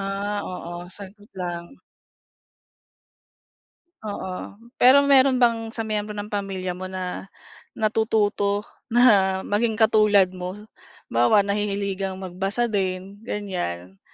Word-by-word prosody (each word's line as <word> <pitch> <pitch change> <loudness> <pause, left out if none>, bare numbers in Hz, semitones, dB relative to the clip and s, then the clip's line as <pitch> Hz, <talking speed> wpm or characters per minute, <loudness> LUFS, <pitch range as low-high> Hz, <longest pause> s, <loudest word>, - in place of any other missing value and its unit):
Ah, 200 +1 -2
oo, 175 -1 -7
saglit 205 +2 -12
lang. 175 -2 -4 2.3
Oo, 200 -3 -5 0.5
pero 270 +3 +7
meron 270 -1 +5
bang 230 -2 +2
sa 225 -1 -4
miyembro 210 -1 -3
ng 205 +1 -6
pamilya 195 -2 -3
mo 185 +1 -7
na 185 0 -5 0.5
natututo 210 -2 +1 0.2
na 205 -6 +4
maging 220 +1 0
katulad 210 -4 +4
mo? 180 +1 -6 0.6
Halimbawa 120 - +4
nahihiligang 200 -1 -2
magbasa 195 +4 -2
din, 190 0 -2
ganiyan. 135 - -5
200 Hz, 100 wpm, -24 LUFS, 185-215 Hz, 2.3 s, pero